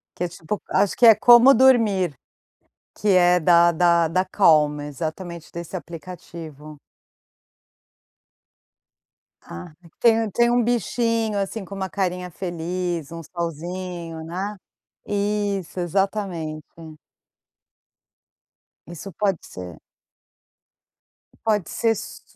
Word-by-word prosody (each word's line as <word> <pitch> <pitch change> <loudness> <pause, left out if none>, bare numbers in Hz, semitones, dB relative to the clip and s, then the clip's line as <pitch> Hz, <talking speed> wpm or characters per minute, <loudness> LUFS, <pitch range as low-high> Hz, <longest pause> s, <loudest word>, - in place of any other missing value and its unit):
Que 180 - -2
é - - -2
tipo 175 +3 -6
acho 200 - +1
que 245 - +5
é 225 -2 +9
como 240 +5 +7
dormir. 225 - +3 0.9
Que 210 - +1
é 180 -1 +5
da 170 +1 +5
da 170 -1 +3
da 185 +3 +1
Calm. 150 -7 +3
Exatamente 160 +3 -6
desse 170 +2 -6
aplicativo. 160 -3 -10 2.7
Ah. 85 - -10 0.3
Tem 225 -1 +4
um 220 - -2
tem 235 +4 +2
um 245 0 +2
bichinho, 230 -1 0
assim, 195 +1 -4
com 200 - -11
uma 190 -1 -4
carinha 180 -1 -3
feliz. 175 -2 -4
Um 165 0 -7
solzinho, 170 0 -6
né. 190 +5 -5 0.5
Isso. 205 -3 -2
Exatamente. 175 -4 -2 2.3
Isso 175 +3 -9
pode 195 -1 0
ser. 90 -3 -10 1.7
Pode 210 -5 0
ser 230 - 0
s - - -9
180 Hz, 105 wpm, -22 LUFS, 165-205 Hz, 2.7 s, é